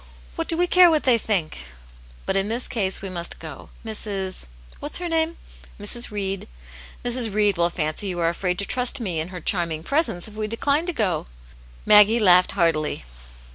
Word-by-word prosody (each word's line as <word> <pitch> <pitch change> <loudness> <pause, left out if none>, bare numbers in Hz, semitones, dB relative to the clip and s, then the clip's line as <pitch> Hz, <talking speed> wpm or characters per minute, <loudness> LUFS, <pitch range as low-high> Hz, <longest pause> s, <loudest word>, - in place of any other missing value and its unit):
What - - -3
do 330 - +2
we 355 - +3
care 360 0 +6
what 310 -2 +2
they 245 -3 +3
think?" 190 - -2 0.7
But - - -1
in 195 +1 +1
this 235 +3 -2
case 195 -5 -2
we 195 - -4
must 175 -1 -4
go. 155 -4 -10 0.2
Mrs. 195 - -2
— - - -23
—, - - -20
what's 290 - -2
her 355 - -4
name 325 0 0
?" - - -20
" - - -23
Mrs. 235 +4 +2
Read." 195 -2 -4 0.3
" 60 - -17
Mrs. 240 -2 0
Read 205 -1 +2
will 170 0 +1
fancy 155 +3 -2
you 180 -2 -4
are 165 -1 +2
afraid 180 +1 -2
to 200 - -1
trust 250 +3 0
me 185 -9 -3
in 160 - -3
her 180 -1 -8
charming 165 -3 -2
presence, 275 - 0
if 215 - -13
we 215 0 -4
decline 285 - 0
to - - 0
go." 185 - -1 0.6
Maggie 210 +2 +7
laughed 180 -5 +5
heartily. 165 - 0
200 Hz, 210 wpm, -23 LUFS, 175-240 Hz, 0.7 s, Maggie